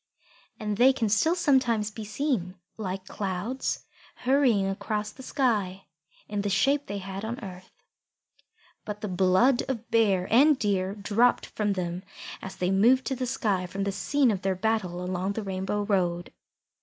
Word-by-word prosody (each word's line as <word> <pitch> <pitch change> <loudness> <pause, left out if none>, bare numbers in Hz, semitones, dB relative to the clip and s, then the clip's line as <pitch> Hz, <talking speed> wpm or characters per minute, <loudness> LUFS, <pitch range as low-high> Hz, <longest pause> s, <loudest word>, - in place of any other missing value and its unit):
And 210 -1 -2
they 260 +4 +6
can 230 -5 -1
still 270 - +3
sometimes 245 - +2
be 220 +1 -7
seen, 215 - -2 0.2
like 190 -3 -5
clouds 200 +7 -3 0.4
hurrying 250 -7 +3
across 210 +2 -3
the 260 - -13
sky, 210 -8 -1 0.4
in 205 -1 -2
the 205 - -1
shape 275 +9 +2
they 200 - -4
had 195 +1 -6
on 235 +3 -4
earth. 185 -1 -9 1.1
But 210 -1 -6
the 210 - -3
blood 190 +7 +3
of 240 -3 -4
Bear 200 -5 +3
and 290 +6 +7
of - - -5
Deer 195 -4 0
dropped 215 +4 +2
from 210 -2 -1
them 180 -1 -3 0.4
as 190 - -7
they 180 +1 -1
moved 240 +7 +4
to 265 - -1
the 255 0 -3
sky 200 -7 0
from 195 +2 -4
the 200 - -1
scene 275 +5 +2
of 195 -3 -2
their 190 -1 0
battle 185 -3 -1
along 185 +2 -2
the 220 - -4
Rainbow 195 +1 -2
road. 175 -4 -1
205 Hz, 170 wpm, -27 LUFS, 190-240 Hz, 1.1 s, and